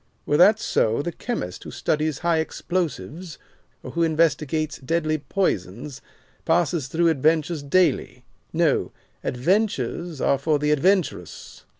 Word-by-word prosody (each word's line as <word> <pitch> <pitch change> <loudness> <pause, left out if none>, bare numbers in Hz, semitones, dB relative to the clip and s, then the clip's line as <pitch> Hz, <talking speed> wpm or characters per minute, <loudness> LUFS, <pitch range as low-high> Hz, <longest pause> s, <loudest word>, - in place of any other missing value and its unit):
Were 145 - +2
that 205 +6 +7
so, 115 - +1
the 175 - -3
chemist 165 - -5
who - - -8
studies 155 0 -1
high 170 -2 +3
explosives, 170 0 -3 0.5
or - - -7
who 170 - -2
investigates 155 -2 +1
deadly 155 +2 -1
poisons, 135 - -2 0.4
passes 165 -3 +1
through 165 +4 +2
adventures 155 +1 +1
daily. 155 +1 +1 0.3
No, - - +1 0.3
'adventures 170 - -1
are 140 - +2
for 150 +2 +1
the 150 +1 0
adventurous. 160 - -1
155 Hz, 120 wpm, -23 LUFS, 140-170 Hz, 0.5 s, that